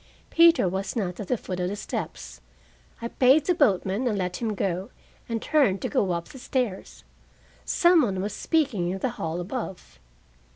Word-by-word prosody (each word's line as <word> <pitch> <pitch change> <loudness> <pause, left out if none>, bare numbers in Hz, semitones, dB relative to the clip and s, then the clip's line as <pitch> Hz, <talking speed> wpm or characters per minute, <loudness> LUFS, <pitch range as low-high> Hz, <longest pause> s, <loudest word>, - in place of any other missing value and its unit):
Peter 335 - +6
was 190 +5 -3
not 185 -6 -2
at 205 - -5
the 250 - +1
foot 185 -3 -5
of 180 0 -1
the 200 - -3
steps. 200 - -6 0.6
I - - -1
paid 265 +5 +4
the 360 - +3
boatman 215 - +1
and 215 -4 0
let 180 -2 -2
him 220 -3 -2
go, 185 0 -2 0.4
and 230 -1 -1
turned 255 -9 +2
to - - -1
go 195 - +1
up 170 0 -4
the 265 - -11
stairs. 250 -7 -3 0.6
Some 345 -1 +4
one 195 -8 0
was 205 +2 -3
speaking 255 - 0
in 190 - -2
the 250 - -1
hall 165 +1 -2
above. 180 - -6
205 Hz, 180 wpm, -26 LUFS, 185-260 Hz, 0.6 s, Peter